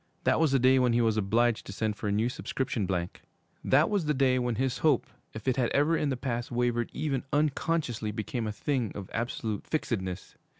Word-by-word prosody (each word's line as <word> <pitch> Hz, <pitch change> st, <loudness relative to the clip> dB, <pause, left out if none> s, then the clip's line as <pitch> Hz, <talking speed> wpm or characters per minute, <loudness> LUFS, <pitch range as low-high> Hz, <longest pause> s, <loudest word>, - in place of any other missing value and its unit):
That -, -, +3 dB
was 160 Hz, -3 st, +3 dB
the 135 Hz, -, +4 dB
day 130 Hz, +1 st, +5 dB
when 125 Hz, -2 st, +3 dB
he 120 Hz, -, +3 dB
was 110 Hz, -2 st, +2 dB
obliged 110 Hz, +3 st, +2 dB
to -, -, -6 dB
send 105 Hz, +1 st, -1 dB
for 105 Hz, -, -5 dB
a -, -, +1 dB
new 105 Hz, +3 st, +1 dB
subscription 125 Hz, -4 st, -2 dB
blank. 90 Hz, -2 st, -3 dB, 0.4 s
That 145 Hz, +4 st, +4 dB
was 200 Hz, -6 st, 0 dB
the 150 Hz, 0 st, +1 dB
day 130 Hz, -1 st, +3 dB
when 120 Hz, -2 st, -1 dB
his 130 Hz, +2 st, -1 dB
hope, 155 Hz, -2 st, +3 dB, 0.3 s
if 110 Hz, +1 st, -8 dB
it 130 Hz, -, +2 dB
had 125 Hz, -3 st, +2 dB
ever 150 Hz, +4 st, +3 dB
in 150 Hz, -, 0 dB
the 130 Hz, -, -1 dB
past 120 Hz, -2 st, -3 dB
wavered 120 Hz, -1 st, 0 dB
even 140 Hz, -4 st, -1 dB
unconsciously, 145 Hz, -5 st, 0 dB
became 110 Hz, +2 st, -3 dB
a -, -, -1 dB
thing 125 Hz, +1 st, -1 dB
of 100 Hz, -2 st, -7 dB
absolute 115 Hz, -2 st, -3 dB
fixedness. 95 Hz, -, -3 dB
120 Hz, 215 wpm, -29 LUFS, 110-135 Hz, 0.4 s, day